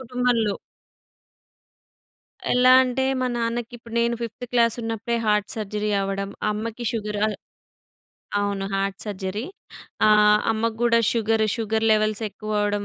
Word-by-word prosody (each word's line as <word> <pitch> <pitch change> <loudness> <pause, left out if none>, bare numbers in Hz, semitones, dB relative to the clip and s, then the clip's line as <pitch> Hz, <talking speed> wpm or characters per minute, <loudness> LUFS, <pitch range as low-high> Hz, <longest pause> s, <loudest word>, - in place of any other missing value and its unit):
కుటుంబంలో. 245 -4 0 2.0
ఎలా 250 +1 +5
అంటే 255 +1 -1 0.2
మా 255 - +1
నాన్నకి 235 0 -2
ఇప్పుడు 230 0 -12
నేను 235 0 +1
ఫిఫ్త్ 235 +2 -6
క్లాస్ 230 -2 +3
ఉన్నప్పుడే 225 +1 -2
హార్ట్ 210 -1 +2
సర్జరీ 210 -1 -3
అవ్వడం, 195 0 -3 0.2
అమ్మకి 225 +3 -4
షుగర్. 210 -2 -3
అ - - 0 1.1
అవును, 200 -1 -1
హార్ట్ 195 0 -2
సర్జరీ 200 +1 -4 0.6
ఆహ్, 210 0 +6
అమ్మకు 225 0 -1
గూడా 230 -1 +4
షుగర్ 225 -1 +1
షుగర్ 220 0 -1
లెవెల్స్ 215 0 +1
ఎక్కువ 215 +1 -7
అవ్వడం 205 0 0
220 Hz, 125 wpm, -23 LUFS, 210-235 Hz, 2.0 s, ఆహ్